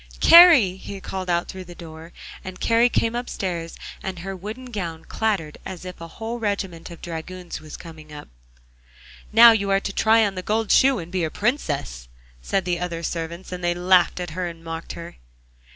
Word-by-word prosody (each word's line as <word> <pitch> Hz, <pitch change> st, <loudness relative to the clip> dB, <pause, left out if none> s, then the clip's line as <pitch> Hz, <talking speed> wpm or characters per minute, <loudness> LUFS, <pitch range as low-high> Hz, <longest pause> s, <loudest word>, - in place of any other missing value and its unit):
'Kari!' 320 Hz, -, +8 dB
he 195 Hz, +1 st, -8 dB
called 185 Hz, -1 st, -5 dB
out 170 Hz, 0 st, +1 dB
through 190 Hz, 0 st, -7 dB
the 175 Hz, 0 st, -11 dB
door, 165 Hz, 0 st, -11 dB, 0.3 s
and 185 Hz, 0 st, -8 dB
Kari 230 Hz, +1 st, +3 dB
came 230 Hz, -1 st, 0 dB
upstairs, 180 Hz, -8 st, -4 dB, 0.2 s
and 190 Hz, -1 st, -5 dB
her 195 Hz, +3 st, -6 dB
wooden 220 Hz, +7 st, -8 dB
gown 170 Hz, -7 st, -5 dB
clattered 200 Hz, -9 st, -2 dB
as 185 Hz, -1 st, -8 dB
if 180 Hz, -1 st, -9 dB
a 165 Hz, -, -7 dB
whole 225 Hz, +7 st, -6 dB
regiment 195 Hz, -6 st, -3 dB
of 170 Hz, -, -12 dB
dragoons 175 Hz, +1 st, -7 dB
were 155 Hz, -, -13 dB
coming 155 Hz, -1 st, -11 dB
up. 145 Hz, -1 st, -9 dB, 1.0 s
'Now, 230 Hz, +2 st, +9 dB
you 200 Hz, -3 st, 0 dB
are 195 Hz, 0 st, +3 dB
to 195 Hz, -, -5 dB
try 220 Hz, +2 st, +4 dB
on 200 Hz, -, -2 dB
the 185 Hz, -, -5 dB
gold 220 Hz, +3 st, -1 dB
shoe 270 Hz, -1 st, +5 dB
and 175 Hz, -3 st, -7 dB
be 185 Hz, -2 st, -1 dB
a 160 Hz, -, 0 dB
Princess,' 145 Hz, -, -2 dB, 0.3 s
said 185 Hz, -, -1 dB
the 175 Hz, -1 st, -1 dB
other 170 Hz, -1 st, -4 dB
servants, 170 Hz, +3 st, -5 dB
and 180 Hz, -1 st, -6 dB
they 175 Hz, 0 st, +1 dB
laughed 180 Hz, 0 st, +3 dB
at 175 Hz, -2 st, -5 dB
her 180 Hz, +2 st, -3 dB
and 165 Hz, -1 st, -9 dB
mocked 165 Hz, 0 st, -6 dB
her. 170 Hz, 0 st, -9 dB
180 Hz, 195 wpm, -23 LUFS, 165-205 Hz, 1.0 s, Now